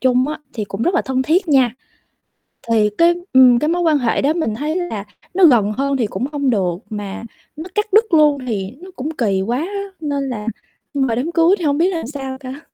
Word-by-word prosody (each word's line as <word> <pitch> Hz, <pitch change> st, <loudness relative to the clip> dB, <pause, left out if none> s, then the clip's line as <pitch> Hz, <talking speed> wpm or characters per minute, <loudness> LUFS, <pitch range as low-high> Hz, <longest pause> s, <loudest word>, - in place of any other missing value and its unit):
chung 255 Hz, +1 st, +2 dB
á 310 Hz, -, -4 dB, 0.2 s
thì 215 Hz, -3 st, -3 dB
cũng 200 Hz, +3 st, -5 dB
rất 355 Hz, -, +1 dB
là 345 Hz, -, +2 dB
thân 260 Hz, -1 st, -1 dB
thiết 340 Hz, +6 st, +1 dB
nha. 260 Hz, -5 st, +3 dB, 1.0 s
Thì 215 Hz, -2 st, +3 dB
cái, 340 Hz, +1 st, +4 dB, 0.2 s
ừm, 250 Hz, -2 st, +7 dB
cái 300 Hz, -, 0 dB
mối 350 Hz, +1 st, 0 dB
quan 320 Hz, -3 st, +3 dB
hệ 240 Hz, -4 st, 0 dB
đó 290 Hz, +3 st, +2 dB
mình 315 Hz, -11 st, -2 dB
thấy 300 Hz, +6 st, -2 dB
là 350 Hz, -, -3 dB, 0.3 s
nó 375 Hz, -1 st, +5 dB
gần 220 Hz, -8 st, +4 dB
hơn 275 Hz, +4 st, -1 dB
thì 230 Hz, -5 st, 0 dB
cũng 230 Hz, +7 st, -3 dB
không 280 Hz, -3 st, 0 dB
được 185 Hz, -6 st, 0 dB
mà 205 Hz, 0 st, -6 dB, 0.3 s
nó 315 Hz, +3 st, -7 dB
cắt 420 Hz, -, +1 dB
đứt 440 Hz, -3 st, +4 dB
luôn 295 Hz, -4 st, +4 dB
thì 200 Hz, -3 st, -3 dB
nó 375 Hz, -, -11 dB
cũng 290 Hz, +5 st, -4 dB
kỳ 200 Hz, -5 st, +1 dB
quá 235 Hz, +6 st, -1 dB
á 395 Hz, +6 st, -3 dB, 0.2 s
nên 280 Hz, -3 st, -2 dB
là 215 Hz, -3 st, -5 dB, 0.5 s
nhưng 275 Hz, -1 st, +1 dB
mà 225 Hz, -, 0 dB
đám 285 Hz, +8 st, -2 dB
cưới 340 Hz, +3 st, +4 dB
thì 330 Hz, -, -3 dB
hông 285 Hz, 0 st, +2 dB
biết 350 Hz, +3 st, +3 dB
làm 330 Hz, -9 st, -3 dB
sao 270 Hz, -2 st, -6 dB
cả. 265 Hz, +2 st, -8 dB
275 Hz, 235 wpm, -19 LUFS, 230-325 Hz, 1.0 s, ừm